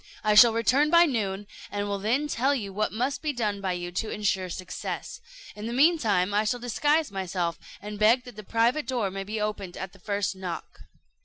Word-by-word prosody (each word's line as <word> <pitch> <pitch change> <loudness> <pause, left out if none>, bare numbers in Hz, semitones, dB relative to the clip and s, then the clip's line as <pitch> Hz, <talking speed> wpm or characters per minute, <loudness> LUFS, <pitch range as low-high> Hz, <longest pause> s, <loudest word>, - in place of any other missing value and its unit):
I 215 - +3
shall 225 +3 +9
return 250 +6 +3
by 340 +1 +7
noon, 205 - -2 0.2
and 205 0 -3
will 200 -1 -2
then 245 +9 0
tell 275 0 +1
you 200 -7 -5
what 215 +2 0
must 255 +6 -2
be 305 - -1
done 210 -6 -2
by 190 -2 -1
you 175 0 -5
to 215 +5 -3
insure 195 -3 -1
success. 180 +1 -6 0.3
In 210 +1 -6
the 235 - -3
mean 315 +6 +4
time, 200 -4 +1
I 210 +1 +3
shall 245 +3 -1
disguise 290 +4 +1
myself, 180 -3 -2 0.2
and 210 0 -6
beg 230 +4 +4
that 245 -3 -12
the 215 - -7
private 235 +8 +1
door 235 -7 -1
may 195 0 -4
be 215 +2 -4
opened 205 -4 -3
at 190 -1 -6
the 195 - -17
first 200 0 -2
knock." 185 -3 -7
210 Hz, 215 wpm, -27 LUFS, 195-245 Hz, 0.3 s, shall